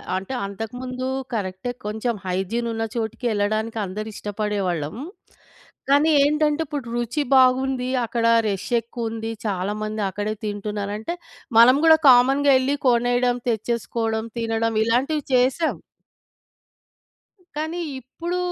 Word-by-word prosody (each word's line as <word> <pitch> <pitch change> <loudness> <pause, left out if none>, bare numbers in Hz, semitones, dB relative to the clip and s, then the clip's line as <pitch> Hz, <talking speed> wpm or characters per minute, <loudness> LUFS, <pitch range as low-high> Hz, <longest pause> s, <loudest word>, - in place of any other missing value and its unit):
అంటే 195 +7 -4
అంతకుముందు 250 +5 -5 0.3
కరెక్టే 190 +2 -3
కొంచెం 220 +2 -2
హైజీన్ 195 +6 -1
ఉన్న 225 0 -2
చోటికి 230 +2 -3
ఎళ్ళడానికి 215 +2 -1
అందరూ 210 +4 -5
ఇష్టపడేవాళ్ళం. 200 -6 -2 0.9
కానీ 290 +3 +5
ఏంటంటే 300 +1 +2
ఇప్పుడు 285 -3 -5
రుచి 240 +5 -1
బాగుంది. 255 0 +3 0.2
అక్కడ 230 0 -1 0.2
రష్ 195 +2 -3
ఎక్కువుంది. 225 -1 -5
చాలా 195 -1 -1
మంది 215 0 -3
అక్కడే 205 +3 -3
తింటున్నారంటే 210 - -4 0.4
మనం 250 +3 +8
గూడా 320 0 +8
కామన్‌గా 270 +3 +5
ఎళ్ళి 270 +2 0
కొనేయడం, 245 0 +2
తెచ్చేసుకోవడం, 225 0 -1
తినడం 225 0 -1
ఇలాంటివి 270 +7 +1
చేసాం. 260 +6 +2 1.8
కానీ 315 +3 -3 0.2
ఇప్పుడు 335 +8 -5
230 Hz, 105 wpm, -23 LUFS, 210-260 Hz, 1.8 s, మనం